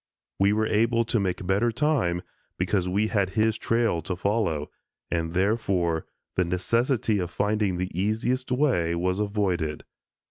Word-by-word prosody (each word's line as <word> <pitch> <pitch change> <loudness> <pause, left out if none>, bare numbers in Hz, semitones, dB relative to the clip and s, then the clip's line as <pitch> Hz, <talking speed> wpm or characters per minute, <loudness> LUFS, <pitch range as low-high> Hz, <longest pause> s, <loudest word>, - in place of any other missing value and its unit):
We 100 +1 +4
were 110 +1 +2
able 115 +2 +2
to 115 - 0
make 95 -1 -2
better 100 +6 +2
time 115 - +1 0.3
because 90 0 0
we 100 +4 +1
had 100 -4 +1
his 110 0 +3
trail 115 -6 +1
to 90 +3 -3
follow, 95 -6 -1 0.4
and, 85 0 -1
therefore, 95 -5 +1 0.3
the 90 - +2
necessity 110 +5 +1
of 90 -2 -2
finding 105 -1 0
the 90 +1 -3
easiest 110 +8 -1
way 125 - +2
was 90 +3 0
avoided. 95 -7 -1
100 Hz, 145 wpm, -26 LUFS, 90-110 Hz, 0.4 s, We